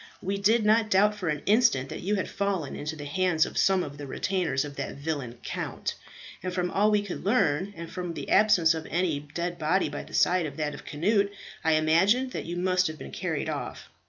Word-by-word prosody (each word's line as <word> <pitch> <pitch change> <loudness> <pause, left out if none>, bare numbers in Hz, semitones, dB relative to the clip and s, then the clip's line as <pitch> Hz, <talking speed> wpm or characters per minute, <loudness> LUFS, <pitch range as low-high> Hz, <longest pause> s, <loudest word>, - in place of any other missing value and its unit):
We 200 +2 -2
did 215 +2 +3
not 220 +1 +4
doubt 205 +2 +4
for 195 -5 -3
an 150 -1 -2
instant 210 - +3
that - - -6
you 205 +4 0
had 190 - -1
fallen 195 -7 -2
into 150 +2 -4
the 145 -2 -8
hands 175 +1 +2
of - - -8
some 190 -2 +3
of 145 -1 -8
the 145 - -6
retainers 160 -3 -1
of 145 -1 -8
that - - -4
villain 140 -5 -4
Count; - - -4 0.5
and 185 - -3
from 180 -1 -1
all 210 +2 +3
we 210 -1 +2
could 200 - -6
learn, 195 -4 +2
and 170 0 -6
from 180 -1 -5
the - - -6
absence 185 -6 +5
of 160 -1 -5
any 170 -3 0
dead 170 +4 -5
body 165 +5 +1
by - - -5
the - - -9
side 180 -2 +3
of 145 - -9
that 150 -1 -1
of - - -10
Cnut, 200 +7 +2 0.3
I 160 -1 +3
imagined 190 +12 +3
that - - -4
you 175 +1 -4
must 185 0 +2
have 155 0 -6
been 70 - -9
carried - - -3
off. - - -5
180 Hz, 225 wpm, -27 LUFS, 155-200 Hz, 0.5 s, absence